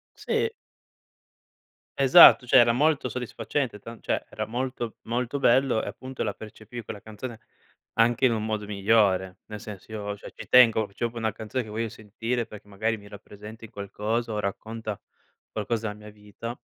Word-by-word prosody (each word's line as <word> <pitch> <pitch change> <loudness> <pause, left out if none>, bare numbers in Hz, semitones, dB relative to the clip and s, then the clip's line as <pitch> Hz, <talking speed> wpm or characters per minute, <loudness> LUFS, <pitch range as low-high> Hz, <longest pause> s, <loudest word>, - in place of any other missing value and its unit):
Sì. 455 - 0 1.5
Esatto. 135 -1 +9
Cioè, 130 - +6
era 120 -1 +6
molto 140 +1 +2
soddisfacente 125 0 -3
tan 115 +2 -10
cioè - - -1
era 110 - -4
molto, 120 0 -3
molto 125 +4 -2
bello, 130 -2 +3
e - - -5
appunto 130 0 -5
la - - -1
percepivi 110 +2 -9
quella 105 -1 -8
canzone 110 +2 -8 0.5
anche 120 +3 +3
in 125 - +5
un 110 -1 -2
modo 110 -1 -2
migliore. 100 -2 +2
Nel 105 -1 -7
senso, 105 0 -10
io 105 -2 -4
cioè - - -11
ci - - -10
tengo, 115 -4 +6
c'ho 100 +4 -4
proprio 115 0 -10
una 110 -1 -1
canzone 115 +4 -3
che 110 - -11
voglio 115 +2 -2
sentire 115 +3 -3
perché 105 -1 -12
magari 110 +3 -1
mi 100 -1 -14
rappresenti 105 +2 -11
qualcosa 105 +4 -3
o 105 - -2
racconta 110 +1 -4 0.5
qualcosa 110 +1 -2
della 105 0 -8
mia - - -8
vita. 105 +3 -8
110 Hz, 170 wpm, -26 LUFS, 105-120 Hz, 1.5 s, Esatto